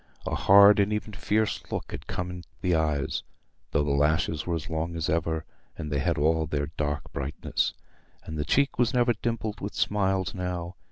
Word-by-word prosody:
A - - -2
hard 100 +1 +7
and 100 +1 +3
even 105 0 -2
fierce 105 +2 0
look - - -4
had - - -7
come 90 0 -3
in 90 0 -8 0.2
the 90 -1 +1
eyes, 75 -4 0 0.5
though 75 - +1
their 75 -1 0
lashes 75 +2 +1
were 85 - 0
as 80 - -4
long 80 +1 -2
as 80 -2 -1
ever, 80 0 0 0.3
and 75 -1 -5
they 70 - +1
had - - 0
all 80 +2 +2
their 70 0 -2
dark 75 -2 -3
brightness. 70 +2 -1 0.5
And 80 - -7
the 75 - -1
cheek 140 - +1
was 120 0 +2
never 120 -1 +4
dimpled 110 -1 -3
with 100 - -5
smiles 95 -2 +1
now. 90 -1 -4
85 Hz, 190 wpm, -27 LUFS, 75-100 Hz, 0.5 s, hard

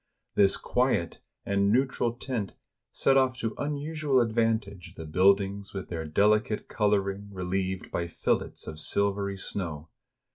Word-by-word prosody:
This 100 -1 +4
quiet 125 -10 0 0.3
and 100 0 +2
neutral 125 -1 +1
tint 120 -4 -4 0.4
set 135 - +3
of! 130 -1 +3
to 115 -3 -2
unusual 145 -1 0
advantage 110 -5 0
the 80 - -7
build 95 +5 +5
ings 100 +1 -6
with 95 - -5
their 80 -2 -4
delicate 105 +6 +2
coloring 100 -1 0
relieved 95 0 -3
by 85 - -1
fillets 85 - -1
of 80 0 -7
sil 100 +3 +2
very 100 -1 -3
snow. 85 -5 -5
100 Hz, 140 wpm, -28 LUFS, 95-115 Hz, 0.4 s, build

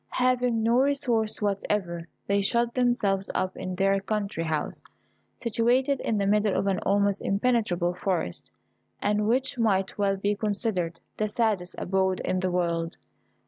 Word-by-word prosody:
Having 250 -2 +2
no 235 +2 +3
resource 245 -6 +1
whatever, 195 -4 -1 0.2
they 200 0 +2
shut 235 +4 +1
themselves 225 -6 +1
up 185 0 -1
in 185 0 -5
their 195 +1 +2
country 200 -4 -2
house, 155 -2 -2 0.6
situated 245 +4 +1
in 220 - -1
the 200 - +1
middle 210 0 +2
of 195 - 0
an 195 -1 +1
almost 200 0 +1
impenetrable 200 -5 +1
forest, 180 - -3 0.5
and 210 0 +1
which 255 +2 0
might 195 -3 +1
well 195 -1 +2
be 205 +2 0
considered 200 -5 -1 0.2
the 215 - 0
saddest 210 -5 -1
abode 190 0 0
in 185 - -1
the 185 0 0
world. 170 -2 -1
205 Hz, 145 wpm, -27 LUFS, 185-230 Hz, 0.6 s, no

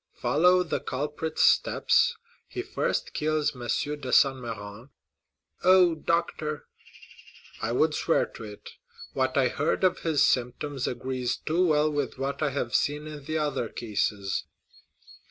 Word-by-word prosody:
"Follow 180 +4 +3
the 170 - -2
culprit's 150 +4 -2
steps; - - +3 0.3
he - - -5
first - - -2
kills 155 -1 0
M. 125 - -10 0.4
de 130 -3 -5
Saint 135 -1 +5
Méran——" 115 0 -8 0.7
"Oh, 185 -2 +6
doctor!" 155 -2 -2 1.0
"I 115 - -1
would 155 +6 +2
swear 165 - +1
to - - -11
it; 105 -1 -10 0.4
what 130 0 0
I 130 -2 +4
heard 150 +8 -1
of 185 -1 +3
his 160 -4 +2
symptoms 125 +2 -1
agrees 125 0 -2
too 175 +3 +1
well 155 -1 +3
with 145 -3 -2
what 135 +3 -3
I 150 - +2
have 130 -4 -3
seen 150 +1 0
in 150 -2 -9
the 155 +1 -2
other 145 -6 -1
cases." 105 -3 -2
145 Hz, 140 wpm, -27 LUFS, 125-155 Hz, 1.0 s, Oh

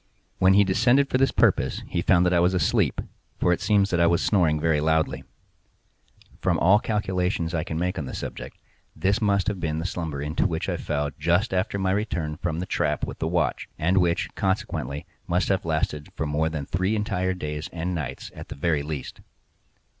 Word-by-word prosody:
When 95 +1 +5
he 100 - +7
descended 120 +8 +3
for 130 - +2
this 135 - +4
purpose - - +2
he 85 - -1
found 90 0 +4
that 90 - +2
I 85 - +4
was 90 +2 +3
asleep, 85 - +1 0.4
for 90 - +3
it - - -3
seems 100 -2 +2
that 85 - +1
I 85 - +5
was 85 +1 +3
snoring 85 -7 +2
very 80 -1 +2
loudly. 80 +1 +1 1.2
From - - +1
all 95 +5 +5
the - - -12
calculations 90 -5 -1
I 80 -2 0
can 80 -2 -4
make 90 +2 -1
on 75 - -4
the 65 - -6
subject, - - -7 0.4
this 100 +4 +1
must 100 -3 +2
have 105 -3 -1
been 80 -2 -2
the 80 - -3
slumber 80 -6 -3
into 75 +3 0
which 80 -1 -3
I - - -1
fell 75 -1 -2
just 85 +5 +1
after 95 +2 0
my 95 -1 0
return 90 -7 -2
from 85 -2 -2
the 90 - -2
trap - - 0
with - - -8
the 80 - -1
watch, 85 -1 -1
and 90 +5 +2
which, 85 -2 0
consequently, 75 -8 -2 0.2
must 90 +2 +1
have 95 -3 +1
lasted 80 -2 -2
for - - -2
more 75 +2 0
than 75 -3 -4
three 95 +7 0
entire 95 -3 -1
days 75 -3 -5
and 85 +2 -3
nights 70 -6 -5
at - - -10
the - - -6
very 75 0 0
least. 75 -2 -6
85 Hz, 205 wpm, -25 LUFS, 80-95 Hz, 1.2 s, he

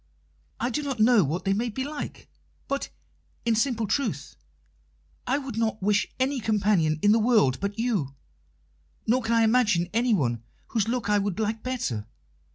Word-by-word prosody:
I 240 +2 -1
do 300 - -1
not 275 -5 -4
know 220 -2 +5
what 165 +6 -3
they 195 - +2
may 230 +4 -1
be 260 +4 -3
like, 290 +1 -6 0.4
but, 275 0 -2 0.6
in 230 - +3
simple 230 -1 +1
truth, 200 - -2 0.9
I 265 - +2
would 265 -6 -5
not 220 -2 0
wish 210 +1 +2
any 265 +1 +1
companion 205 -8 +2
in 205 - +6
the 225 - +4
world 215 - +3
but 200 +1 -3
you, 205 - -1 0.9
nor 250 +3 +2
can 225 0 -1
I 230 - +4
imagine 215 -7 +2
anyone 190 - +1 0.3
whose 220 -3 0
look 240 -2 -1
I 205 0 +3
would 200 0 -2
like 220 0 -1
better. 175 - -3
220 Hz, 165 wpm, -26 LUFS, 200-245 Hz, 0.9 s, in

